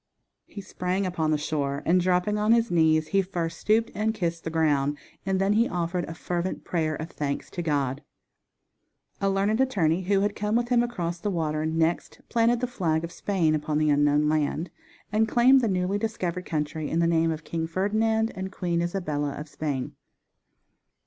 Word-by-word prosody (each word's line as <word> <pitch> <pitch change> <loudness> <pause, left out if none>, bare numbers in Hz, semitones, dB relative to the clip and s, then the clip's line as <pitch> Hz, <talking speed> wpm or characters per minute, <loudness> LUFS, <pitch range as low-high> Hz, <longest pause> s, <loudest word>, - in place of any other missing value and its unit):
He 200 - -8
sprang 185 +1 -2
upon 165 -4 -1
the 155 - +2
shore, 145 -2 -2
and 180 +2 +4
dropping 185 +3 +1
on 215 +2 +4
his 230 -2 +2
knees 160 -2 +3
he 195 - +3
first 175 -3 -4
stooped 225 +2 +2
and 220 +2 -1
kissed 170 -4 -2
the - - -3
ground, 145 -3 +1 0.3
and 190 -1 +1
then 195 +2 +2
he 230 +3 +3
offered 175 0 -2
a 165 - -7
fervent 175 +1 -3
prayer 160 -3 -1
of 160 +2 -6
thanks 140 -1 -3
to 175 - -4
God. 140 -4 -1 1.2
A 195 - +2
learned 200 +5 +1
attorney 185 -10 +2
who 195 +1 +1
had 205 0 0
come 210 +1 -1
with 240 0 +1
him 245 -1 +4
across 175 -8 -3
the 205 - -2
water 155 -4 -1
next 165 +1 -1
planted 235 +1 +2
the - - +2
flag 170 -10 -1
of 170 - -5
Spain 175 -4 0
upon 150 0 -1
the 155 -1 +3
unknown 145 +1 +3
land, 155 +2 0 0.4
and 220 +1 +2
claimed 255 +4 +5
the 235 - +1
newly 185 +1 0
discovered 180 -5 -3
country 155 -1 -2
in 165 - -1
the 170 - +3
name 165 -1 +2
of 160 -1 -3
King 165 -1 -3
Ferdinand 220 +5 +1
and 190 0 -5
Queen 175 -3 -1
Isabella 155 -5 -2
of 150 - -6
Spain. 145 -4 -3
175 Hz, 190 wpm, -26 LUFS, 155-205 Hz, 1.2 s, claimed